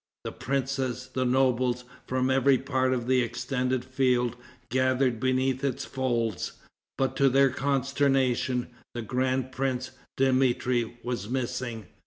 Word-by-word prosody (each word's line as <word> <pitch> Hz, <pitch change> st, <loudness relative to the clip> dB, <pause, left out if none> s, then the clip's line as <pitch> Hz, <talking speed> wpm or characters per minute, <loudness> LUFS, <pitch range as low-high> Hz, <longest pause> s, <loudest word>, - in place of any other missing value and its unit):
The -, -, -4 dB
princes, 130 Hz, 0 st, -2 dB
the 130 Hz, 0 st, 0 dB
nobles, 125 Hz, -1 st, +2 dB, 0.2 s
from 130 Hz, 0 st, +1 dB
every 135 Hz, 0 st, +4 dB
part 130 Hz, 0 st, 0 dB
of 125 Hz, -2 st, -1 dB
the 130 Hz, 0 st, +3 dB
extended 125 Hz, +1 st, -1 dB
field, 125 Hz, -2 st, +1 dB, 0.3 s
gathered 130 Hz, -1 st, +2 dB
beneath 130 Hz, +1 st, +1 dB
its 135 Hz, -3 st, -1 dB
folds. 120 Hz, -6 st, -1 dB, 0.4 s
But 135 Hz, -1 st, 0 dB
to 140 Hz, -1 st, +5 dB
their 135 Hz, +1 st, +4 dB
consternation, 135 Hz, -2 st, +1 dB, 0.3 s
the 120 Hz, -, -3 dB
grand 130 Hz, +3 st, 0 dB
prince, 130 Hz, -1 st, -2 dB, 0.3 s
Dmitri, 130 Hz, -3 st, +2 dB
was 120 Hz, -4 st, -3 dB
missing. 120 Hz, -3 st, -3 dB
130 Hz, 125 wpm, -27 LUFS, 125-130 Hz, 0.4 s, to